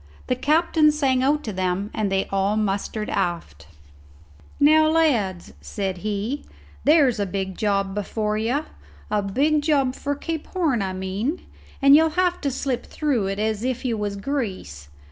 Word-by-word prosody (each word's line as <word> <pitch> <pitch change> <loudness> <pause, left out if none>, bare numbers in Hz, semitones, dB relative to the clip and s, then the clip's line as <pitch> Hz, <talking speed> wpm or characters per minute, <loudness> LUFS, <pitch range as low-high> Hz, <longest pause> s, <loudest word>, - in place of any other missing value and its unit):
The 250 - 0
captain 305 +3 +3
sang 270 -4 +1
out 295 +3 +2
to 215 - -4
them 185 +3 -2
and 210 -3 -1
they 195 0 +1
all 195 +2 +1
mustered 210 +1 -2
aft. 165 - -3 0.9
"Now, 310 +2 +6
lads," 235 - +1
said 190 -3 -4
he, 215 +7 -3 0.4
"there's 285 -7 +4
a 200 - 0
big 190 0 -3
job 195 -1 0
before 210 +1 -2
you 240 +8 -1 0.5
a 210 -1 +2
big 285 +10 +1
job 280 -4 +2
for 285 +2 -3
Cape 320 +2 -5
Horn, 315 - 0
I 190 -1 -2
mean; 195 - -3 0.4
and 275 +1 +8
you'll 320 +1 +5
have 360 -1 +1
to 280 - 0
slip 260 -1 -3
through 265 -10 -1
it 195 0 -3
as 215 0 -1
if 255 +1 -2
you 235 -3 0
was 205 -1 -3
grease. 195 - -4
220 Hz, 165 wpm, -23 LUFS, 195-290 Hz, 0.9 s, and